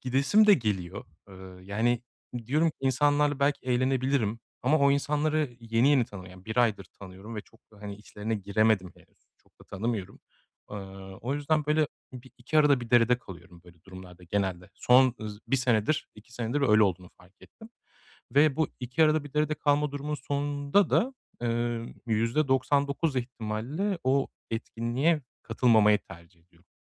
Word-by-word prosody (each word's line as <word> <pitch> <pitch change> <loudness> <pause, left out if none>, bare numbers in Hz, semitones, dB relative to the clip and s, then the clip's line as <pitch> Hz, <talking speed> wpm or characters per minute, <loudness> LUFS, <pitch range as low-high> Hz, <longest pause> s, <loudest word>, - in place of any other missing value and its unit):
gidesim 140 +12 +3
de 205 - +8
geliyor, 100 - -3 0.2
ııı, 95 -1 -12
yani 115 +5 0 0.4
diyorum 155 +4 +2
insanlarla 145 +2 +2
belki 140 -1 0
eğlenebilirim 130 -3 0 0.2
ama 150 +5 +3
o 140 0 +4
insanları 145 -1 0
yeni 115 +3 +2
yeni 140 -4 +4
tanıyor, 95 -4 -11
yani 95 0 -15
1 110 +3 -6
aydır 110 -5 +2 0.2
tanıyorum 100 +4 -10
ve - - -3
çok 115 - -23
da, 105 - -18
hani, 100 -1 -6
içlerine 105 +1 -5
giremedim 100 -1 +1
henüz. - - -25
Çok - - -34
da - - -15
tanımıyorum. 100 -1 -4 0.5
Iıı, 95 -1 -9
o 130 +5 -2
yüzden 150 +1 0
böyle 150 0 +2 0.3
bir 125 +1 -11
iki 140 +6 0
arada 145 -4 +4
bir 115 - -8
derede 120 0 +4
kalıyorum 90 -4 -13
böyle 85 -2 -19
durumlarda 90 -2 -12
genelde. 90 -1 -2
Son, 125 0 +4
ııı, 105 -1 -6
1 135 - +2
senedir 125 +4 +1
2 120 +4 -4
öyle 110 -4 +5
olduğunu 90 -3 -1
fark 95 +2 -21
ettim 220 +1 -15 0.6
ve 145 0 +4
bu 160 -2 +1
iki 125 +6 0
arada 155 -1 +2
bir 145 - -11
derede 150 0 +1
kalma 145 -1 +1
durumunun 145 +1 -3
sonunda 145 +5 0
da, 260 +3 +2 0.3
eee, 120 0 -2
%99 135 +5 +1
ihtimalle 125 - -3
o 135 +1 +2 0.2
etkinliğe 120 +7 -1 0.2
katılmamayı 110 -3 +4
tercih 85 -2 -16
ediyorum. 85 0 -29
120 Hz, 155 wpm, -28 LUFS, 105-145 Hz, 0.6 s, de